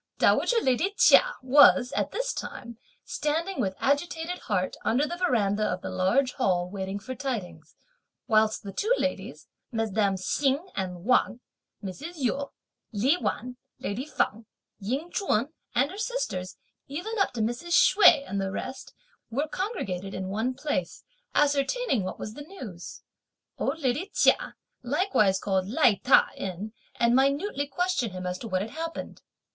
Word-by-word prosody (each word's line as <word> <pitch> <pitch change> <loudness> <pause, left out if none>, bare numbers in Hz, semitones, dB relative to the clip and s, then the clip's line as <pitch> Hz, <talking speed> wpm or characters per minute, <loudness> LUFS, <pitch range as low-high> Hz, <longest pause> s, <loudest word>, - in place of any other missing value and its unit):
Dowager 480 - +3
lady 320 +11 +1
Chia - - +6
was, 260 -1 +6
at - - -1
this - - -2
time, 235 -2 -7 0.3
standing, 325 +6 -1
with 190 -1 -1
agitated 325 +5 -1
heart, 185 -4 -1
under 260 +6 +2
the 345 - -4
verandah 215 - +1
of 180 0 -3
the - - -4
Large 250 +8 +2
Hall 180 -7 +1
waiting 190 +1 -4
for 255 +6 -6
tidings, 250 -8 -5 0.5
whilst 220 -1 +2
the 200 - -6
two 430 - -1
ladies, - - -3 0.3
mesdames 210 -4 0
Hsing 290 +6 0
and 180 -2 -4
Wang, 250 -1 +2 0.4
Mrs. 275 - -6
Yu, 280 -1 -1 0.4
Li 245 - +2
Wan, 250 -6 -3 0.2
lady 235 +8 -4
Feng, 225 -6 -1 0.3
Ying 265 - -3
Ch'un 265 - 0 0.3
and 265 +5 +2
her 395 - -8
sisters, 230 - -3 0.3
even 370 +11 -4
up 390 - +2
to 235 - -2
Mrs. 240 +11 +3
Hsüeh 300 -9 +6
and 200 0 -2
the 195 - -1
rest, 260 +7 -6 0.3
were 280 +7 -1
congregated 200 - -4
in 190 0 -4
one 225 +6 -1
place 255 - -3 0.3
ascertaining 285 - +2
what 185 - -5
was 215 - -6
the 290 - -9
news. 255 - -9 0.6
Old 280 +4 -1
lady 295 +6 -1
Chia - - +2 0.3
likewise 245 - +2
called 190 -1 -1
Lai 240 -2 +3
Ta 265 - +5
in 195 +3 -5 0.2
and 235 0 +3
minutely 280 +3 +1
questioned 290 - -1
him 185 0 -6
as 180 0 -3
to 230 - -6
what 185 -2 0
had 220 - -8
happened. 325 +2 -6
250 Hz, 150 wpm, -27 LUFS, 200-305 Hz, 0.6 s, Chia